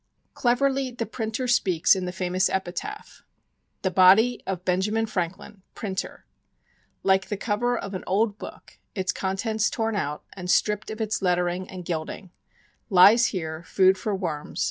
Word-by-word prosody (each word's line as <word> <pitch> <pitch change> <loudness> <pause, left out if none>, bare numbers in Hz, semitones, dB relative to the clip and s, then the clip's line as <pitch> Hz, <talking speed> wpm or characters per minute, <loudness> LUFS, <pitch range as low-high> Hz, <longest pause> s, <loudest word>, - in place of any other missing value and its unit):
Cleverly 265 +2 +1
the 240 -2 -4
printer 225 +3 -3
speaks 190 -9 +3
in 185 -1 -3
the 180 - -3
famous 185 0 0
epitaph: 190 - -5 0.6
The 190 - +1
Body 195 +7 +5
of 185 -1 -4
Benjamin 210 +5 +1
Franklin 190 0 -5
Printer 195 -3 -5 0.8
(Like 190 0 +2
the 205 - -2
cover 235 +4 0
of 200 -2 -6
an 185 - -5
old 205 +2 +1
book - - -11 0.2
Its 190 -2 0
contents 210 +4 -1
torn 225 -1 -2
out 150 -6 -3
And 180 -2 -7
stript 210 +3 +1
of 220 +1 -5
its 215 -1 -1
lettering 180 0 0
and 185 -2 -8
gilding) 170 +2 -5 0.6
Lies 205 +5 +7
here, 160 -4 -4
food 190 +1 +3
for 200 +2 -2
worms. 165 -3 -5
195 Hz, 150 wpm, -25 LUFS, 180-220 Hz, 0.8 s, Lies